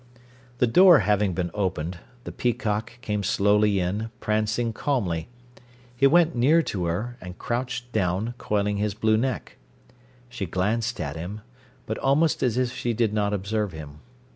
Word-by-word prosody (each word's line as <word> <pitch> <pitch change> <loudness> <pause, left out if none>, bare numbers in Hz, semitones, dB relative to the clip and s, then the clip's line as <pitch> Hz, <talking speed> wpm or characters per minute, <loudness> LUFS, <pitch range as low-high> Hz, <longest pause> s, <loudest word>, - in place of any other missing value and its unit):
The - - +3
door 175 +7 +7
having 105 -2 +1
been 90 -2 -2
opened, 90 -4 -2 0.2
the - - -7
peacock 115 0 -2
came 105 -4 -2
slowly 105 +1 +2
in, 100 +5 -2
prancing 110 +2 0
calmly. 100 - -1 0.7
He 135 +3 +5
went 170 +2 +4
near 150 +8 +4
to 90 - -3
her, 105 +9 -3
and 90 0 -9
crouched 125 0 -3
down, 100 +2 -1
coiling 105 -1 0
his 105 -1 -1
blue 110 0 +2
neck. 130 +3 -2 0.7
She 120 -6 -5
glanced 110 +7 -1
at 70 -1 -3
him, 90 +6 -6 0.4
but - - -4
almost 150 +4 +2
as 125 -2 +1
if 125 -1 0
she 120 -2 -1
did 110 -2 0
not 105 -1 +1
observe 105 0 -2
him. 75 -2 -9
105 Hz, 155 wpm, -25 LUFS, 95-120 Hz, 0.7 s, door